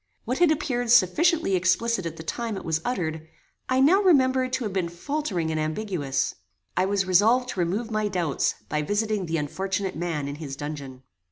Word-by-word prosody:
What 250 +3 -2
had 350 -2 +5
appeared 250 -6 -1
sufficiently 250 - +4
explicit 185 +2 +1
at 165 0 -7
the 160 - -7
time 225 +4 -3
it - - -8
was 160 -1 0
uttered, 160 -9 -3 0.4
I 260 0 +2
now 335 +9 +5
remembered 260 -8 +3
to 260 -1 0
have 210 -4 -3
been 185 -3 -1
faltering 180 - -2
and 155 - -1
ambiguous. 155 -3 -1 0.4
I 185 - +2
was 195 0 0
resolved 225 +8 +4
to 190 - -4
remove 200 +7 -1
my 215 -1 0
doubts, 175 -7 0
by 150 - -1
visiting 205 +2 -1
the 165 0 -1
unfortunate 190 +5 -2
man 160 -4 -2
in 140 +1 -5
his 145 -4 -6
dungeon. 140 -3 -7
190 Hz, 185 wpm, -25 LUFS, 160-245 Hz, 0.4 s, had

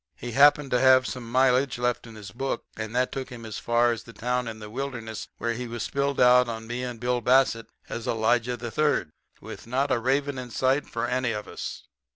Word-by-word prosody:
He 120 - -7
happened 145 +2 +5
to 125 - +3
have 130 0 +6
some 120 -2 -6
mileage 130 +1 +3
left 120 0 -1
in 115 - -12
his 105 -3 -9
book, 135 +3 -3
and 110 +1 -5
that 125 0 +1
took 135 -1 -5
him 120 -3 -9
as 110 -2 -6
far 120 0 +2
as 115 - -3
the 115 - -14
town 125 +1 -1
in 110 -1 -6
the 105 -1 -9
wilderness 115 -2 -5
where 115 0 -1
he 125 +1 -5
was 115 -1 -4
spilled 140 0 -1
out 125 0 +6
on 110 -1 -5
me 120 +2 -4
and 125 -2 -5
Bill 125 +1 0
Bassett 125 -2 +3 0.2
as 115 - -5
Elijah 115 +2 +1
III. 120 - 0 0.3
with - - -10
not 135 +4 0
a 120 - +2
raven 135 +2 0
in 125 -1 -7
sight 130 +4 +1
for 115 - -2
any 125 -2 0
of 105 0 -5
us. - - -6
125 Hz, 220 wpm, -26 LUFS, 115-130 Hz, 0.3 s, have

